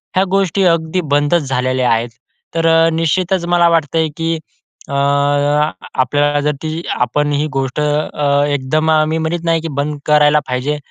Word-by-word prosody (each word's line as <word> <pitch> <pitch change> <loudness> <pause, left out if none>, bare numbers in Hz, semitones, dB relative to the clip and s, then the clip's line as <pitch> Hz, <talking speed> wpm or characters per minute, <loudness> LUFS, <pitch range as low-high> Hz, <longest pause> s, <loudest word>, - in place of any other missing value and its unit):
ह्या 185 - +4
गोष्टी 195 0 +1
अगदी 165 +1 0
बंदच 145 +4 +2
झालेल्या 130 -1 0
आहेत. 115 +1 0 0.5
तर 165 0 +1
अ, 165 0 +4
निश्चितच 170 +3 0
मला 175 0 +3
वाटतंय 160 -1 +1
की, 165 0 -1 0.5
अ, - - -5 1.1
आपल्याला 145 +3 +1
जर - - +3
ती 160 +1 -3
आपण 145 +4 0
ही 145 +1 0
गोष्ट 135 0 -2
अ, 145 -1 0
एकदम 145 +3 0
अ, 155 -1 +4
मी 160 +1 -1
म्हणत 165 +1 -2
नाही 165 -1 +1
की 165 - -4
बंद 150 0 -4
करायला 150 0 +4
पाहिजे. 130 +4 -2
155 Hz, 160 wpm, -16 LUFS, 145-165 Hz, 1.1 s, ह्या